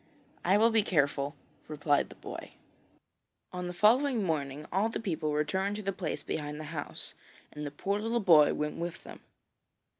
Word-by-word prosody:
'I 190 Hz, +3 st, +4 dB
will 225 Hz, +2 st, +5 dB
be 220 Hz, -1 st, +4 dB
careful,' 145 Hz, -6 st, +1 dB, 0.3 s
replied 145 Hz, -1 st, +1 dB
the -, -, -12 dB
boy. -, -, -8 dB, 1.0 s
On 180 Hz, 0 st, -3 dB
the -, -, -3 dB
following 235 Hz, +6 st, +4 dB
morning 150 Hz, -4 st, -2 dB
all 200 Hz, +5 st, +2 dB
the -, -, -3 dB
people 160 Hz, -8 st, -2 dB
returned 190 Hz, +7 st, 0 dB
to 210 Hz, -, -5 dB
the 195 Hz, 0 st, -1 dB
place 180 Hz, -4 st, -3 dB
behind 150 Hz, -1 st, -4 dB
the -, -, -5 dB
house, 150 Hz, -3 st, -5 dB, 0.4 s
and 150 Hz, 0 st, -5 dB
the -, -, -3 dB
poor 195 Hz, +8 st, -2 dB
little 230 Hz, +2 st, 0 dB
boy 165 Hz, -8 st, +6 dB
went 150 Hz, 0 st, -2 dB
with 170 Hz, 0 st, -5 dB
them. -, -, -10 dB
175 Hz, 175 wpm, -30 LUFS, 150-205 Hz, 1.0 s, boy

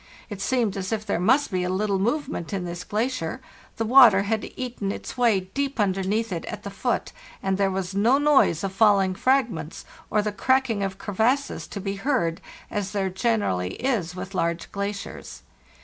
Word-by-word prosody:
It 200 Hz, -1 st, -6 dB
seemed 230 Hz, -1 st, +1 dB
as 190 Hz, +1 st, -4 dB
if 215 Hz, -1 st, -2 dB
there 200 Hz, -5 st, -1 dB
must 255 Hz, +10 st, +3 dB
be 180 Hz, -1 st, 0 dB
little 195 Hz, +1 st, 0 dB
movement 240 Hz, -, -2 dB
in 190 Hz, -2 st, -2 dB
this 175 Hz, 0 st, -5 dB
glacier; 215 Hz, -6 st, -2 dB, 0.4 s
the 225 Hz, -, -1 dB
water 230 Hz, -5 st, +7 dB
had 215 Hz, +1 st, -2 dB
eaten 245 Hz, -6 st, -3 dB
its -, -, -6 dB
wav 200 Hz, -7 st, +1 dB
deep 280 Hz, -2 st, -2 dB
underneath 200 Hz, +2 st, 0 dB
it 170 Hz, -2 st, -3 dB
at -, -, -7 dB
the -, -, -6 dB
foot, -, -, -2 dB, 0.3 s
and 195 Hz, 0 st, +1 dB
there 195 Hz, 0 st, +2 dB
was 190 Hz, 0 st, -3 dB
no 225 Hz, +7 st, +4 dB
noise 285 Hz, -, +3 dB
of 195 Hz, -1 st, -2 dB
falling 195 Hz, -2 st, +4 dB
fragments 220 Hz, -, 0 dB, 0.2 s
or 210 Hz, -1 st, +2 dB
the 210 Hz, -, -1 dB
cracking 250 Hz, +1 st, +1 dB
of 195 Hz, -1 st, -2 dB
crevasses 225 Hz, +8 st, 0 dB
to 200 Hz, -, -6 dB
be 195 Hz, 0 st, -3 dB
heard, 195 Hz, -, 0 dB, 0.3 s
as 205 Hz, -2 st, -3 dB
there 195 Hz, -2 st, -1 dB
generally 185 Hz, -, 0 dB
is 210 Hz, -10 st, -1 dB
with 185 Hz, +2 st, -7 dB
large 170 Hz, -2 st, -1 dB
glaciers. 200 Hz, 0 st, -5 dB
200 Hz, 180 wpm, -25 LUFS, 190-235 Hz, 0.4 s, water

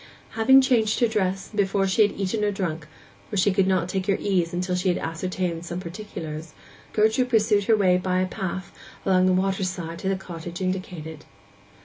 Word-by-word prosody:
Having 265 Hz, +4 st, +6 dB
changed 235 Hz, -5 st, +2 dB
her 240 Hz, -, +4 dB
dress, 195 Hz, -3 st, -1 dB
and 215 Hz, -, -10 dB
before 195 Hz, -1 st, +2 dB
she 190 Hz, +3 st, +2 dB
had 205 Hz, -1 st, +4 dB
eaten 200 Hz, +2 st, -1 dB
or 210 Hz, -, +2 dB
drunk—for 170 Hz, +1 st, -6 dB
she 195 Hz, +2 st, +4 dB
could 190 Hz, 0 st, +2 dB
not 185 Hz, -2 st, +1 dB
take 190 Hz, +1 st, -3 dB
her 195 Hz, -, +2 dB
ease 180 Hz, -4 st, 0 dB
till 180 Hz, 0 st, -2 dB
she 180 Hz, +1 st, -1 dB
had 175 Hz, -, +1 dB
ascertained 170 Hz, 0 st, -3 dB
some 175 Hz, +1 st, -5 dB
particulars—Gertrude 190 Hz, +6 st, -3 dB
pursued 210 Hz, -3 st, +3 dB
her 220 Hz, +1 st, +4 dB
way 185 Hz, -3 st, +4 dB
by 185 Hz, 0 st, 0 dB
a 185 Hz, -, +2 dB
path 190 Hz, -1 st, -5 dB, 0.3 s
along 185 Hz, -1 st, +4 dB
the -, -, +4 dB
water 190 Hz, +1 st, +1 dB
side 170 Hz, -2 st, -4 dB
to 190 Hz, -, -2 dB
the 195 Hz, -, +1 dB
cottage 175 Hz, -2 st, -7 dB
indicated. 180 Hz, -5 st, -4 dB
190 Hz, 190 wpm, -24 LUFS, 175-205 Hz, 0.3 s, Having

